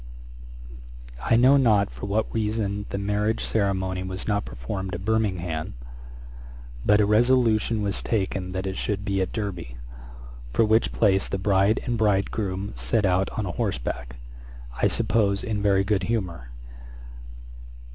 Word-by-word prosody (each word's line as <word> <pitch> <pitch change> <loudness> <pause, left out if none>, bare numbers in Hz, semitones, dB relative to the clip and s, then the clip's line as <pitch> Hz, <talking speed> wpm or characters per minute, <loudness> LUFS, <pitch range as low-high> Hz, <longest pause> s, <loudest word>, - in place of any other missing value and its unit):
] - - -14
I - - +5
know 130 +4 +6
not 110 -7 +3
for - - -7
what 105 +2 -1
reason 105 -2 -1
the - - -3
marriage 105 +2 0
ceremony 95 -3 0
was 95 0 -5
not 105 -1 0
performed 85 +11 -5
at 95 +3 -7
Birmingham; 90 - -1 1.1
but 105 0 +4
a 105 - +4
resolution 115 -1 +3
was 100 -1 -1
taken 95 -4 -2
that 95 +1 -3
it 95 0 -3
should 100 -1 -2
be 95 -1 0
at 95 - -2
Derby, 90 - -5 0.8
for 110 - +4
which 110 +2 +2
place 95 -3 +2
the - - -1
bride 100 +2 +2
and 120 -2 -1
bridegroom 100 -1 0
set 60 - 0
out 95 +1 +2
on 110 - -1
horseback, 60 -7 -3 0.7
I - - +5
suppose 100 -3 +1
in 110 -4 -2
very 100 -1 +3
good 100 -1 +1
humour. 95 - -3
100 Hz, 145 wpm, -25 LUFS, 95-110 Hz, 1.1 s, know